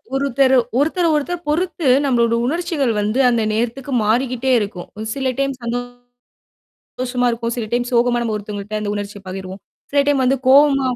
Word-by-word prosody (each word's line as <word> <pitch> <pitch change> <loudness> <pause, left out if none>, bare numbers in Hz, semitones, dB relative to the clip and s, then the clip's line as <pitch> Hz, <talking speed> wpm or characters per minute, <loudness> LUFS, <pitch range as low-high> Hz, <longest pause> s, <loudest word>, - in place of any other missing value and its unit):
ஒருத்தர 270 -1 +2 0.3
ஒருத்தர, 335 +4 +1
ஒருத்தர் 345 +4 -2
பொறுத்து 340 -1 -1 0.2
நம்மளோட 235 -3 +2
உணர்ச்சிகள் 325 -5 -1
வந்து 210 +5 0
அந்த 235 -2 +1
நேரத்துக்கு 240 +5 -2
மாறிக்கிட்டே 250 +3 0
இருக்கும். 200 -4 -5
ம் 220 - -4
சில 265 -2 -1
டைம்ஸ் 275 -1 -1
வந்து 235 +1 -1 1.1
சந்தோஷமா 250 -1 -1
இருக்கும். 230 0 -3
சில 235 - -3
டைம் 240 0 0
சோகமா 240 0 +2
நம்ம 220 -2 -2
ஒருத்தவுங்கக்கிட்ட 210 0 -5
அந்த 205 -1 -2
உணர்ச்சிய 205 0 -6
பகிர்வோம். 190 +1 -7 0.3
சில 285 0 +4
டைம் 280 -2 +2
வந்து 270 +2 +2
கோவமா 275 0 +5
245 Hz, 160 wpm, -19 LUFS, 220-275 Hz, 1.1 s, கோவமா